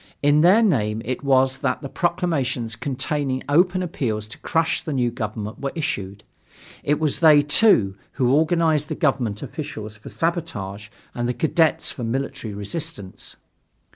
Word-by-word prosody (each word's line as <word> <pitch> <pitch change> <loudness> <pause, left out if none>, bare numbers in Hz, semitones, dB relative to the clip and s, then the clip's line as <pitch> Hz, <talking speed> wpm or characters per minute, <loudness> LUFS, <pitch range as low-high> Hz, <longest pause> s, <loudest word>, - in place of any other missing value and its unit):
In 145 +1 +5
their 190 +7 +6
name 110 - +1
it 130 +3 -3
was 135 -1 +3
that - - -1
the - - -3
proclamations 140 -9 -1
containing 130 +2 -2
open 180 +5 +3
appeals 115 -11 -2
to - - -9
crush 165 0 0
the 155 - -3
new 125 -3 +1
government 110 -2 -5
were 140 -1 -2
issued. 100 - -3 0.6
It 150 +1 +1
was 155 -3 0
they, 155 -3 +7
too, 145 - +4 0.2
who 130 -2 +2
organized 160 -1 +2
the - - -3
government 125 - 0
officials 110 -9 -6
for 105 - -11
sabotage 105 - -3 0.2
and 120 0 -2
the 125 - -1
cadets 160 +4 +2
for 125 - -7
military 115 -3 -3
resistance. 105 - -5
135 Hz, 150 wpm, -22 LUFS, 110-160 Hz, 0.6 s, they